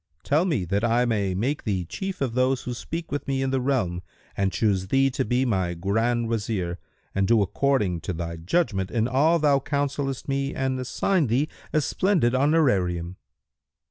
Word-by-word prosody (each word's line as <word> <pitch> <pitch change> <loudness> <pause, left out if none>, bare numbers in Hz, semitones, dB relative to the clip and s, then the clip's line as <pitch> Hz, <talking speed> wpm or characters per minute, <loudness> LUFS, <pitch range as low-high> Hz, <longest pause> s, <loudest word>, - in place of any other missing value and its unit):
Tell 155 +5 +2
me, 140 - 0
that 100 +5 -1
I 120 +1 +3
may 100 -5 0
make 130 +10 -1
thee 95 -5 -1
chief 190 - -5
of 130 -4 0
those 130 +1 +1
who 125 - -4
speak 165 +6 -6
with 145 - -3
me 135 -1 0
in 135 - -1
the 135 -1 +1
realm 120 -10 0 0.3
and 100 -1 0
choose 95 -4 0
thee 135 +5 +3
to 130 +1 -1
be 125 +1 +1
my 95 -7 0
Grand 115 +6 0
Wazir 105 -6 -2 0.3
and 95 0 +1
do 115 -3 +4
according 100 -6 0
to 95 - -3
thy 85 0 -5
judgment 95 - 0
in 115 0 0
all 145 +7 +3
thou 145 -3 +3
counsellest 140 -1 -2
me 140 0 -1
and 130 -1 -1
assign 155 +5 +1
thee 130 +7 +1 0.2
a 155 - +2
splendid 170 -7 +1
honorarium." 100 - +1
125 Hz, 180 wpm, -25 LUFS, 95-140 Hz, 0.3 s, do